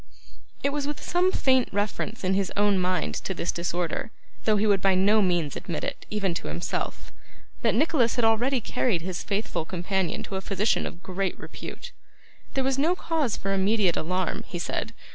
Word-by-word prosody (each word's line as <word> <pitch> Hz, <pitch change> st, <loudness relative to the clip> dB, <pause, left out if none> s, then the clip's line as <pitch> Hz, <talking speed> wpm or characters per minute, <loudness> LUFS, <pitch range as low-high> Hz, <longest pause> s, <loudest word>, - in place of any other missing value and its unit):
It 280 Hz, -, +2 dB
was 290 Hz, 0 st, -1 dB
with 295 Hz, -, -3 dB
some 360 Hz, +1 st, +2 dB
faint 260 Hz, -7 st, +3 dB
reference 205 Hz, +2 st, -2 dB
in 185 Hz, +1 st, +2 dB
his 195 Hz, -1 st, +1 dB
own 205 Hz, -1 st, +4 dB
mind 185 Hz, 0 st, 0 dB
to 190 Hz, -, -3 dB
this 170 Hz, -, -1 dB
disorder, 175 Hz, +3 st, -2 dB, 0.4 s
though 215 Hz, -1 st, +4 dB
he 210 Hz, -, +2 dB
would 200 Hz, -3 st, +3 dB
by 195 Hz, -1 st, +4 dB
no 205 Hz, +4 st, +5 dB
means 175 Hz, -6 st, +1 dB
admit 175 Hz, -4 st, -4 dB
it, -, -, -4 dB
even 200 Hz, -4 st, 0 dB
to -, -, -4 dB
himself, 75 Hz, +3 st, -3 dB, 0.5 s
that -, -, +2 dB
Nicholas 260 Hz, -3 st, +3 dB
had 240 Hz, -3 st, +2 dB
already 240 Hz, +4 st, +3 dB
carried 205 Hz, -5 st, 0 dB
his 180 Hz, -1 st, -3 dB
faithful 205 Hz, -4 st, -1 dB
companion 185 Hz, +1 st, -1 dB
to 195 Hz, -, -4 dB
a -, -, -3 dB
physician 200 Hz, +3 st, +1 dB
of 175 Hz, -, -10 dB
great 190 Hz, 0 st, -2 dB
repute. -, -, -8 dB, 0.6 s
There 270 Hz, -, +2 dB
was 270 Hz, 0 st, +1 dB
no 330 Hz, +6 st, +3 dB
cause 320 Hz, -9 st, 0 dB
for 195 Hz, 0 st, -1 dB
immediate 195 Hz, -2 st, +3 dB
alarm, 180 Hz, +2 st, -1 dB
he 175 Hz, -, -5 dB
said. 220 Hz, +6 st, -3 dB
200 Hz, 185 wpm, -27 LUFS, 185-235 Hz, 0.6 s, no